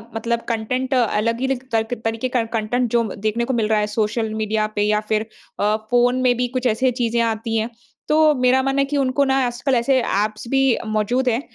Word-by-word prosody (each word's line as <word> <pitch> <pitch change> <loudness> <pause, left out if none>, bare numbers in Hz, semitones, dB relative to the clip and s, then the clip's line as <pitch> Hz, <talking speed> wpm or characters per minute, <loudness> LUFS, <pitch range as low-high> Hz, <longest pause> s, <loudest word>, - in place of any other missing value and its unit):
मतलब 235 +1 -1
कंटेंट 250 +4 -2
अलग 230 -2 +1
ही 265 - +1
लिक 265 -1 -2
तल्क 225 +1 0
तरीके 225 +3 -1
का 245 -2 +1
कंटेंट 240 +3 -1
जो 235 -1 +3
देखने 220 +3 -1
को 260 - -2
मिल 225 -3 +1
रहा 215 -1 +2
है 210 - 0
सोशल 220 0 0
मीडिया 215 0 -1
पे 205 - 0
या 210 0 +2
फिर 215 0 +1 0.3
अ, 210 +1 +2 0.2
फ़ोन 245 +1 +3
में 250 -1 +3
भी 250 - 0
कुछ 255 0 0
ऐसे 250 +3 +1
चीज़ें 235 0 +1
आती 225 0 -1
हैं। 220 +1 -1 0.4
तो 305 - +2 0.2
मेरा 255 +1 +3
मानना 270 +1 +1
है 275 - +2
कि 285 +1 -2
उनको 275 0 +2
ना 270 0 +2
आजकल 250 +2 -1
ऐसे 255 +2 +2
ऐप्स 215 +1 -2
भी 270 0 +2 0.3
मौजूद 220 +4 0
हैं 235 +2 0
235 Hz, 220 wpm, -21 LUFS, 220-255 Hz, 0.4 s, जो